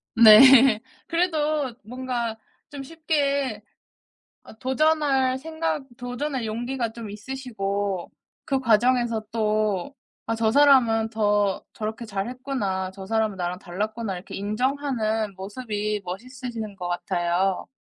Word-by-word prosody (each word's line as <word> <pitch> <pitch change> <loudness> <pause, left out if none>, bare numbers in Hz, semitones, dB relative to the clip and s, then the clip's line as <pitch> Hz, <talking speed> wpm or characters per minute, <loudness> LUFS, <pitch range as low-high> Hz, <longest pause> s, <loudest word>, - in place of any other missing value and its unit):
네. 235 +1 +9 0.3
그래도 310 -6 0
뭔가 240 -1 -3 0.3
좀 280 -1 -7
쉽게 280 -7 -1 0.8
어 - - -13
도전할 270 -2 +2
생각 315 0 -3
도전할 245 +1 -3
용기가 235 +2 -3
좀 230 -3 -8
있으시고 205 -5 -4 0.3
그 270 -1 0
과정에서 235 -1 +2
또 215 0 0 0.3
'아 225 - -1
저 225 -1 +1
사람은 250 -6 +5
더 205 -3 +1
저렇게 220 +2 -5
잘 200 0 -3
했구나. 225 -8 -3
저 190 0 -9
사람은 220 -1 0
나랑 180 0 -3
달랐구나.' 210 +3 -4
이렇게 180 - -8
인정하는 220 -1 -1
모습이 210 +1 -3
멋있으신 230 +2 -6
것 180 -2 -4
같아요. 175 +1 -1
225 Hz, 245 characters per minute, -24 LUFS, 205-265 Hz, 0.8 s, 네